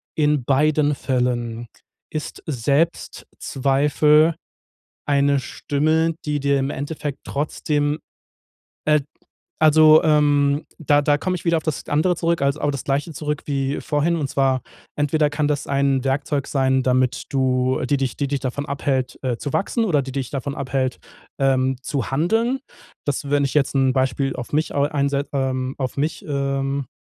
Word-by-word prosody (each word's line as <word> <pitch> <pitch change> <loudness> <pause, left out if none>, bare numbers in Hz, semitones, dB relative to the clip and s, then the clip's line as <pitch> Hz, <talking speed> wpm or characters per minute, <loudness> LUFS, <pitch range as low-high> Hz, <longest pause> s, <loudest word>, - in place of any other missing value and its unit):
in 150 -3 +2
beiden 150 +2 +2
Fällen 120 -3 -1 0.4
ist 155 -1 -5
Selbstzweifel 150 +1 +1 0.7
eine 140 -1 +2
Stimme, 155 +6 0
die 150 -1 -1
dir 140 0 +2
im 135 +1 -1
Endeffekt 145 0 -4
trotzdem 145 +1 -1 0.9
äh 150 0 +4 0.6
also, 155 0 +7
ähm, 145 -1 +3
da 145 -2 +3
da 145 0 +2
komme 185 +4 -1
ich 175 - -10
wieder 170 -1 +3
auf - - -7
das 155 -3 -3
andere 165 +5 +2
zurück, 170 0 0
als 140 +1 +1
aber 145 -1 -1
das 140 - -4
Gleiche 145 +4 -1
zurück 150 0 -3
wie 140 -1 -1
vorhin. 155 +3 +1
Und 150 -4 -2
zwar, 135 -2 +1 0.3
entweder 150 +1 +2
kann 145 0 0
das 145 -1 -1
ein 140 -1 +1
Werkzeug 140 +1 -1
sein, 130 -1 +1
damit 130 -1 +1
du 130 -1 +1
die 140 +2 +1
dich 130 -3 -2
die 140 - -1
dich 140 0 -1
davon 135 +2 -3
abhält, 135 -3 -2
äh, 125 -3 -1
zu 140 +3 -5
wachsen 230 +3 0
oder 165 -9 +2
die 135 0 -7
dich 135 -2 -3
davon 140 0 -3
abhält, 130 -2 -2 0.4
ähm, 130 -1 +2
zu 140 -4 -3
handeln. 225 - +1 0.5
Das 140 0 -2
wenn 145 0 +3
ich 135 - -2
jetzt 145 -2 +2
'n 135 -1 +3
Beispiel 130 +1 0
auf 120 -1 -7
mich 155 +2 0
au 140 - +2
einse 140 -1 0
ähm, 130 -1 -1
auf 130 0 -3
mich 150 +3 -2
ähm 140 -1 -1
140 Hz, 160 wpm, -22 LUFS, 135-150 Hz, 0.9 s, also